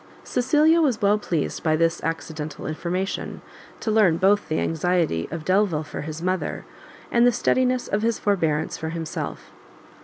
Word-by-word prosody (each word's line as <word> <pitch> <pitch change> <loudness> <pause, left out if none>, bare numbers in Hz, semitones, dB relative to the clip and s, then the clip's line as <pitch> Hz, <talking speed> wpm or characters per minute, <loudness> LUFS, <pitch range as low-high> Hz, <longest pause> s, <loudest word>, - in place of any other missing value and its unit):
Cecilia 305 +6 +3
was 260 -8 +2
well 205 -1 +3
pleased 165 -7 -2
by 155 -1 +2
this 165 +1 +1
accidental 160 -2 -4
information, 175 +5 -3 0.4
to 220 - -1
learn 205 -7 +4
both 200 +3 +2
the 155 - 0
anxiety 165 - 0
of 160 -1 -6
Delvile 185 -5 +2
for 145 - -7
his 155 +2 -6
mother, 185 0 -2 0.5
and 235 - +4
the - - +5
steadiness 255 +2 +1
of 205 - 0
his 230 +1 +1
forbearance 160 -7 0
for 160 - -3
himself. 165 -1 -5
180 Hz, 155 wpm, -24 LUFS, 160-215 Hz, 0.5 s, the